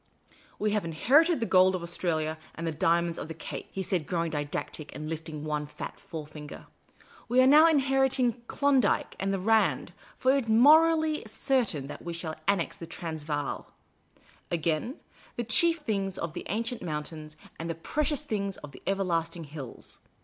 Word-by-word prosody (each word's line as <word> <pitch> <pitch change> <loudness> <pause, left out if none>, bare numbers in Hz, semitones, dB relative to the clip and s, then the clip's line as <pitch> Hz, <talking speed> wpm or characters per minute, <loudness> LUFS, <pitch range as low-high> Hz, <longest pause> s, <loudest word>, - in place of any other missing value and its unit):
" - - -27
We 210 0 0
have 210 -1 +1
inherited 270 - +3
the - - +2
gold 185 -2 +5
of 180 - -4
Australia 160 -2 -1 0.2
and 165 - -5
the 165 - 0
diimonds 170 +2 +1
of - - -5
the 160 - -7
Cape," - - -7
he 190 - -3
said, 175 -4 -1
growing 170 -2 -1
didactic, 145 0 -4
and 155 - -5
lifting 160 -1 -5
one 150 -1 -2
fat 150 - -8
forefinger; 150 -2 -9 0.3
" - - -24
w^e 255 +2 +5
are - - +5
now 300 +4 +8
inheriting 265 -5 +2
Klondike 275 -6 +2
and 195 0 0
the 195 - 0
Rand, 220 +3 +2 0.2
for 260 +1 +3
it 275 -4 0
is - - -7
morally 310 +6 +5
certain 220 - 0
that 140 - -8
we 170 - -5
shall 165 -1 -4
annex 195 -5 +1
the 165 - -8
Transvaal, 155 -4 -4 0.8
Again, 165 - -1 0.2
' - - -26
the 240 - -1
chief 330 +9 +3
things 195 -7 -1
of 165 -2 -4
the - - -6
ancient 230 +3 -2
mountains, 155 -1 -6 0.2
and 165 +1 -4
the 165 - -2
precious 295 - -1
things 200 -8 -2
of 150 - -10
the - - -13
everlasting 175 -4 -1
hills.' 145 -4 -9
180 Hz, 180 wpm, -28 LUFS, 160-245 Hz, 0.8 s, now